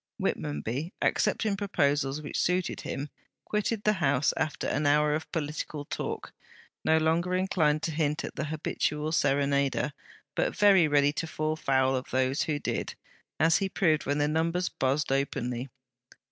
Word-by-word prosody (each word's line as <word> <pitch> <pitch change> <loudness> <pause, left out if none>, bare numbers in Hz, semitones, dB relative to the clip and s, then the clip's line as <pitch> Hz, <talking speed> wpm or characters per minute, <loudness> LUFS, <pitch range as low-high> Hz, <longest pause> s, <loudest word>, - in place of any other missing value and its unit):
Whitmonby, 110 - -2
accepting 210 -2 +1
proposals 145 -7 0
which - - -3
suited 180 0 0
him, 140 +2 -4 0.4
quitted 210 0 -1
the 210 - +4
house, 145 -7 +2
after 155 -2 -2
an 145 +1 0
hour 150 +1 +4
of 155 +1 -3
political 150 -1 -4
talk, - - -5 0.5
no 160 - +4
longer 165 +3 +1
inclined 160 -5 +1
to 165 - -1
hint 150 -1 0
at - - -8
the - - -2
'habitual 150 0 -2
serenader,' 140 -1 +1 0.4
but - - 0
very 195 -5 +6
ready 145 -1 +3
to 165 - -3
fall 155 0 -1
foul 130 -3 +2
of 130 - -4
those 130 +1 +1
who 150 -2 0
did, - - -3 0.4
as 160 +1 +5
he 195 -1 -1
proved 160 -8 +1
when 145 +1 +1
the 145 0 +2
numbers 165 +3 0
buzzed 135 +2 0
openly. 135 -2 -1
150 Hz, 155 wpm, -28 LUFS, 140-165 Hz, 0.5 s, very